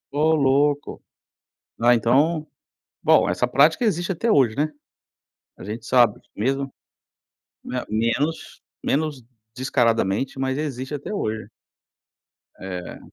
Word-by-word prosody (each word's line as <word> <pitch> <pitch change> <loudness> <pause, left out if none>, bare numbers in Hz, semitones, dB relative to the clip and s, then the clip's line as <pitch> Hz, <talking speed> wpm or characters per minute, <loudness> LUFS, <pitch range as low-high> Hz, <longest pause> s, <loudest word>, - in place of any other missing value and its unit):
Oh 155 +2 +3
louco. 145 +1 +1 0.8
Né, 120 +1 +5
então 145 +8 +2 0.6
bom, - - +4
essa 125 - 0
prática 150 - +4
existe 175 -3 0
até 230 +7 -1
hoje, 130 - +4
né? 155 +1 +1 0.9
A - - -12
gente 110 +4 -7
sabe 120 -4 +4
que - - -35
mesmo 135 +5 -1 0.9
me 125 - -5
menos 115 +9 -1 0.2
menos 145 -3 -1 0.3
descaradamente, 120 -1 0
mas 135 0 -1
existe 135 -2 -4
até 145 +8 -5
hoje, 110 - -3 1.1
eh 90 -2 -7
135 Hz, 115 wpm, -23 LUFS, 115-150 Hz, 1.1 s, Né